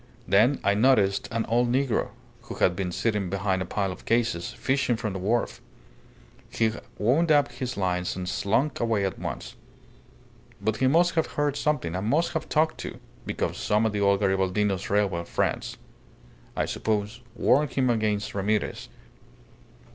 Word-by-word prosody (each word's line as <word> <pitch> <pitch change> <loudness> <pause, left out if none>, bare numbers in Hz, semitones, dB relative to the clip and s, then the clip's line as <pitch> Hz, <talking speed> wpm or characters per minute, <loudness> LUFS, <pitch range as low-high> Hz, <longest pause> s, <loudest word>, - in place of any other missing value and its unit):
Then 110 +9 +4
I 100 - +3
noticed 105 -3 +3
an 115 -1 -1
old 120 +1 +1
negro, 130 -1 +1 0.4
who - - -7
had 90 - +2
been 90 -1 -2
sitting 105 -1 -1
behind 95 0 -1
a - - -2
pile 100 -1 -1
of 90 - -10
cases, 115 -7 0
fishing 135 -2 0
from 110 -3 -3
the 95 - -4
wharf. 110 +6 -1 0.9
He 110 -1 +1 0.3
wound 145 +10 +2
up 145 -3 +4
his 125 -1 -5
lines 90 -2 -1
and 90 -1 -5
slunk 120 +11 0
away 110 -4 +1
at 95 - -3
once. - - -6 1.0
But 110 0 -1
he 130 - +2
must 175 +6 +4
have 160 -2 +1
heard 145 -1 -1
something, 145 - -1
and 95 +3 -2
must 160 +9 +1
have 160 -2 -3
talked, 155 +1 +1
too, - - -6 0.3
because - - -2
some 105 +2 +1
of 110 - +1
the 105 0 -2
old 100 0 +3
Garibaldino's 95 0 0
railway 100 -4 +1
friends, - - -2 0.8
I - - 0
suppose, 105 +2 -2
warned 140 +3 +2
him 130 -2 +2
against 110 -2 -1
Ramirez. 105 +1 -1
110 Hz, 160 wpm, -26 LUFS, 100-130 Hz, 1.0 s, Then